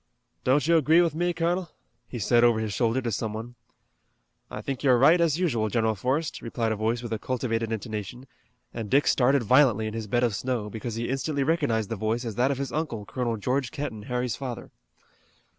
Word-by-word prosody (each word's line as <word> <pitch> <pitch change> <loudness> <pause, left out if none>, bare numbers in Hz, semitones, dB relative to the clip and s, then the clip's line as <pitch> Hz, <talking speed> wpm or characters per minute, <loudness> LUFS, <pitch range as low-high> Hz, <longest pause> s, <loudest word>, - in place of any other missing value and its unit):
"Don't 135 +3 +3
you 170 0 +5
agree 160 +2 +4
with 170 -3 +3
me, 175 +3 0
colonel?" 175 +1 -1 0.4
he 125 - -6
said 120 +2 +3
over 120 -2 +4
his 110 -2 -3
shoulder 120 +3 +1
to 120 - -1
some 105 +1 -2
one. 115 +3 -6 1.0
"I - - -6
think 135 -2 -4
you're 130 -3 +4
right 155 +8 +5
as 165 -2 +2
usual, 120 -12 0
General 110 0 +1
Forrest," 130 - -2
replied 115 -1 -2
a - - 0
voice 115 +3 -1
with 115 -1 -4
a 110 - -2
cultivated 115 -2 -2
intonation, 110 +2 -5 0.5
and 115 -3 -5
Dick 140 +6 +3
started 135 0 +3
violently 120 -2 +4
in 110 - -4
his 110 -1 -5
bed 120 +3 +1
of 120 -3 +2
snow, 120 -3 -2
because 110 +1 -5
he 115 +1 -3
instantly 140 +2 -1
recognized 135 - 0
the - - 0
voice 110 +4 -1
as 115 - -3
that 125 +5 +1
of 140 - -1
his 135 -2 -4
uncle, 140 -10 -3
Colonel 120 0 -2
George 125 +4 -1
Kenton, 140 -7 -5
Harry's 125 -1 -1
father. 130 -4 -6
120 Hz, 210 wpm, -26 LUFS, 110-140 Hz, 1.0 s, you